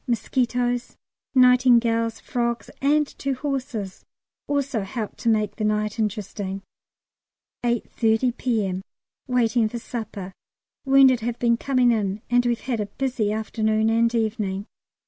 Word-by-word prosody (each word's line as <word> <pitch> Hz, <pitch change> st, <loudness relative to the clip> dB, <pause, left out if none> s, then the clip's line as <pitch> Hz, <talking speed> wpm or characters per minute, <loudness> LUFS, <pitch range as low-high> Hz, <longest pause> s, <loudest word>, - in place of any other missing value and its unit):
Mosquitoes, 245 Hz, 0 st, -1 dB, 0.4 s
nightingales, 240 Hz, -3 st, +4 dB
frogs, 235 Hz, -1 st, -2 dB
and 295 Hz, +2 st, +3 dB
two 275 Hz, -1 st, -1 dB
horses 255 Hz, -8 st, -4 dB, 0.4 s
also 280 Hz, -5 st, 0 dB
helped 210 Hz, +2 st, -5 dB
to 235 Hz, -, +1 dB
make 215 Hz, -2 st, +1 dB
the 220 Hz, -, -3 dB
night 215 Hz, +1 st, 0 dB
interesting. 200 Hz, -2 st, -3 dB, 1.0 s
8.30 235 Hz, 0 st, +1 dB
P.M. 205 Hz, -8 st, -1 dB, 0.5 s
Waiting 235 Hz, -3 st, +2 dB
for 235 Hz, -, -5 dB
supper. 215 Hz, -5 st, -6 dB, 0.5 s
Wounded 270 Hz, -2 st, +6 dB
have 235 Hz, +1 st, -3 dB
been 235 Hz, -1 st, +3 dB
coming 255 Hz, 0 st, +2 dB
in, 210 Hz, -1 st, -1 dB
and 245 Hz, 0 st, +3 dB
we've 240 Hz, -1 st, 0 dB
had 245 Hz, -4 st, -2 dB
a 210 Hz, -, -2 dB
busy 245 Hz, -4 st, -1 dB
afternoon 220 Hz, 0 st, 0 dB
and 230 Hz, +1 st, +2 dB
evening. 210 Hz, -3 st, -1 dB
230 Hz, 125 wpm, -24 LUFS, 215-250 Hz, 1.0 s, Wounded